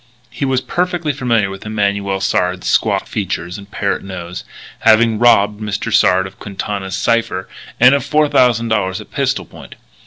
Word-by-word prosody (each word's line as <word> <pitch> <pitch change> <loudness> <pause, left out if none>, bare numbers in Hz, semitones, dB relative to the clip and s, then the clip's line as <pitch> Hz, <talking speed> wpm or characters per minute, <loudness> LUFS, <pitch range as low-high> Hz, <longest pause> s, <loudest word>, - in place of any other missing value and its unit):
He 140 - -3
was 130 -1 +1
perfectly 175 -1 -1
familiar 115 -7 0
with 95 - -9
Emanuel 100 -2 -1
Sard's 90 -1 0
squat - - +1
features 90 -2 -4
and 100 0 -13
parrot 100 -1 -2
nose, 90 -2 -7 0.4
having 110 0 +4
robbed 105 -3 +4
Mr. 105 +1 -3
Sard 95 -3 +4
of 95 0 -11
Quintana's 100 -1 -4
cipher 115 -4 0 0.3
and 125 +3 +7
of 140 - +2
$4,000 115 -10 +2
at - - -12
pistol - - -1
point. - - -13
105 Hz, 150 wpm, -17 LUFS, 95-120 Hz, 0.4 s, and